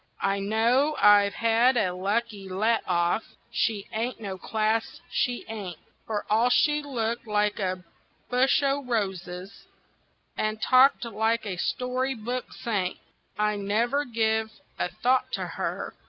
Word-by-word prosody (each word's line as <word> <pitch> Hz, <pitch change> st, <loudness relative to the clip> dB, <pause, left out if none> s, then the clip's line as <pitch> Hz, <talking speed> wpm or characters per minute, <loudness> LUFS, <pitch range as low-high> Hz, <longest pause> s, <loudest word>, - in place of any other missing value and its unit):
I 195 Hz, 0 st, +1 dB
know 235 Hz, +9 st, +2 dB
I've 205 Hz, -1 st, +6 dB
had 230 Hz, +3 st, +3 dB
a 185 Hz, -5 st, +1 dB
lucky 200 Hz, +1 st, -2 dB
let 220 Hz, +5 st, +1 dB
off 175 Hz, +4 st, 0 dB, 0.2 s
she 210 Hz, -3 st, 0 dB
ain't 230 Hz, +3 st, -2 dB
no 200 Hz, -3 st, -5 dB
class, 220 Hz, +3 st, -1 dB
she 245 Hz, -1 st, -1 dB
ain't, 200 Hz, -7 st, -6 dB, 0.3 s
For 210 Hz, -2 st, -2 dB
all 225 Hz, +4 st, +3 dB
she 295 Hz, +4 st, +3 dB
looked 235 Hz, -5 st, -3 dB
like 210 Hz, 0 st, +1 dB
a 185 Hz, -2 st, -2 dB, 0.4 s
bush 255 Hz, +3 st, +3 dB
o' 280 Hz, +1 st, +1 dB
roses 190 Hz, -5 st, -4 dB, 0.7 s
and 215 Hz, 0 st, -1 dB
talked 255 Hz, +2 st, +5 dB
like 225 Hz, 0 st, 0 dB
a 190 Hz, -3 st, -4 dB
story 255 Hz, +5 st, -1 dB
book 245 Hz, +3 st, -4 dB
saint. 205 Hz, -7 st, -2 dB, 0.4 s
I 210 Hz, 0 st, +1 dB
never 230 Hz, +8 st, +1 dB
give 220 Hz, -3 st, 0 dB, 0.3 s
a -, -, 0 dB
thought 255 Hz, +7 st, +1 dB
to -, -, -1 dB
her. -, -, -4 dB
220 Hz, 140 wpm, -26 LUFS, 200-245 Hz, 0.7 s, I've